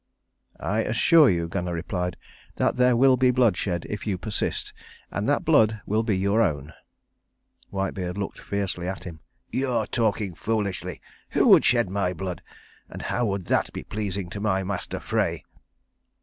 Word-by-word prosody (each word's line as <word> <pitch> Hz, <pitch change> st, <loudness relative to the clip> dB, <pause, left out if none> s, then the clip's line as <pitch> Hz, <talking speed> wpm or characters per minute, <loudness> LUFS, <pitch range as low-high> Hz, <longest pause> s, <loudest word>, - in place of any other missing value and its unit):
"I -, -, -1 dB
assure 160 Hz, -4 st, +5 dB
you," 85 Hz, -2 st, 0 dB
Gunnar 90 Hz, 0 st, -3 dB
replied, 90 Hz, +1 st, -3 dB, 0.4 s
"that -, -, +1 dB
there 125 Hz, -1 st, +4 dB
will 130 Hz, +1 st, +5 dB
be 130 Hz, 0 st, +4 dB
bloodshed 105 Hz, -8 st, +1 dB
if 105 Hz, +1 st, -5 dB
you 100 Hz, -3 st, 0 dB
persist, 105 Hz, +3 st, -3 dB, 0.4 s
and -, -, -2 dB
that -, -, +1 dB
blood 110 Hz, 0 st, +4 dB
will 110 Hz, +2 st, +1 dB
be 110 Hz, -4 st, 0 dB
your 100 Hz, +4 st, +2 dB
own." 75 Hz, -6 st, -1 dB, 1.0 s
Whitebeard 95 Hz, -2 st, -3 dB
looked 100 Hz, -1 st, -4 dB
fiercely 95 Hz, -3 st, -3 dB
at 95 Hz, 0 st, -4 dB
him. 85 Hz, -4 st, -8 dB, 0.3 s
"You 130 Hz, +1 st, -1 dB
are 125 Hz, -, +1 dB
talking 110 Hz, -5 st, 0 dB
foolishly. 105 Hz, 0 st, -3 dB, 0.3 s
Who -, -, +4 dB
would -, -, +7 dB
shed 120 Hz, -4 st, +4 dB
my 95 Hz, -2 st, 0 dB
blood? 90 Hz, 0 st, -5 dB, 0.5 s
And -, -, -8 dB
how 120 Hz, -1 st, 0 dB
would 100 Hz, -3 st, -2 dB
that -, -, +1 dB
be -, -, -6 dB
pleasing 100 Hz, -3 st, -3 dB
to 100 Hz, -, -5 dB
my 95 Hz, -2 st, +1 dB
master 95 Hz, -1 st, -4 dB
Frey?" -, -, -1 dB
100 Hz, 165 wpm, -25 LUFS, 90-110 Hz, 1.0 s, would